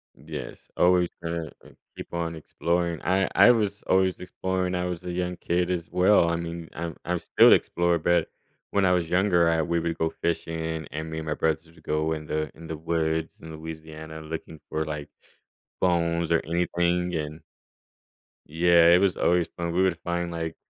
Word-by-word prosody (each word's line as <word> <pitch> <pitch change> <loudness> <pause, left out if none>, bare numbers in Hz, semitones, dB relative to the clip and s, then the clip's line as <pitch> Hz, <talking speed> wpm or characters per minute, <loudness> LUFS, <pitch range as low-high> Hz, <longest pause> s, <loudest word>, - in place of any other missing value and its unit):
Yes. 75 +2 -8
Always 90 -1 +4
gonna 85 -2 -3 0.2
uh, - - -13 0.3
keep - - -9
on 85 -1 -2
exploring. 85 +1 -1
I 95 +1 +2
I - - +8
was 105 -3 0
always 95 0 +2
exploring, 90 0 -2
I 90 0 -1
was 90 -1 -4
a 90 - -3
young 90 0 -2
kid 90 +1 0
as 85 -2 -3
well, 90 -1 +4
I - - +1
mean, 85 -1 -5
I'm 85 0 -5
I'm 90 0 -1
still - - +5
explorer, 85 0 +3
but 85 +2 +2 0.4
when 100 -1 +2
I 90 - +4
was 90 -3 +1
younger, 90 -2 +3
I 80 -1 +2
we 85 +2 0
would 85 0 -2
go 80 0 +1
fishing, 80 -1 -1
and 80 -2 -3
and 80 +1 -5
me 80 - -5
and 80 - -7
my 75 - 0
brothers 80 +1 0
would 80 -1 -20
go 80 +1 0
in 75 -1 -3
the 75 -1 -2
in 80 +1 -11
the 80 - -5
woods 80 0 -1
in 80 - -9
Louisiana 80 0 -8
looking 80 0 -7
for, 80 0 -1
like, 75 -1 -5 0.7
bones 85 -2 +1
or 85 - +4
anything 85 +1 0
and 75 +1 -4 1.1
Yeah, 85 +2 +5
it 90 - +6
was 95 -2 +2
always 85 -1 +2
fun. 85 -1 -3
We 90 +2 +3
would 90 -3 +1
find, 85 0 -2
like, 80 -1 -4
85 Hz, 190 wpm, -26 LUFS, 80-90 Hz, 1.1 s, I